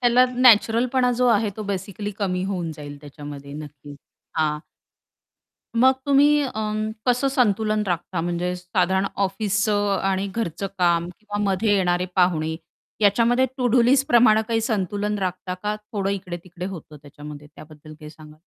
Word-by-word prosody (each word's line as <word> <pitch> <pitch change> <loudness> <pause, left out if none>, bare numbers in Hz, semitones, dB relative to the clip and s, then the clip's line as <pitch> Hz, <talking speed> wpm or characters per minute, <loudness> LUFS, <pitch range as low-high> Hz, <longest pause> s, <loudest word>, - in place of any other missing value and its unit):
त्याला 245 0 +5
नॅचरलपणा 245 +1 +4
जो 250 +1 +1
आहे 215 -2 +2
तो 215 - -5
बेसिकली 200 +1 -4
कमी 185 -3 -1
होऊन 180 -4 -3
जाईल 145 -1 -9
त्याच्यामध्ये 145 -1 -10
नक्कीच. 145 -1 -10 0.4
हां. 150 -1 +1 1.2
मग 260 +1 +6
तुम्ही 290 +1 +5
अं, 215 -3 -2 0.2
कसं 250 +3 +2
संतुलन 215 -4 +1
राखता 175 -1 -2
म्हणजे 175 +1 -2
साधारण 185 +2 0 0.2
ऑफिसचं 205 +1 0
आणि 195 0 0
घरचं 200 -4 -3
काम 170 -1 +2
किंवा 205 -1 -6
मध्ये 200 +2 +1
येणारे 180 -1 +1
पाहुणे 160 -3 +2 0.4
याच्यामध्ये 230 +5 +3
टू-डू 245 -1 +3
लिस्ट 270 +3 +3
प्रमाणे 230 -4 +5
काही 225 -1 +1
संतुलन 210 -1 -2
राखता 185 -1 -3
का? 210 +3 -3
थोडं 210 -2 -4
इकडे-तिकडे 180 -2 -6
होतं 170 -5 -9
त्याच्यामध्ये? 145 0 -11
त्याबद्दल 155 0 -13
काय 150 - -9
सांगाल? 155 0 -15
195 Hz, 140 wpm, -23 LUFS, 170-220 Hz, 1.2 s, मग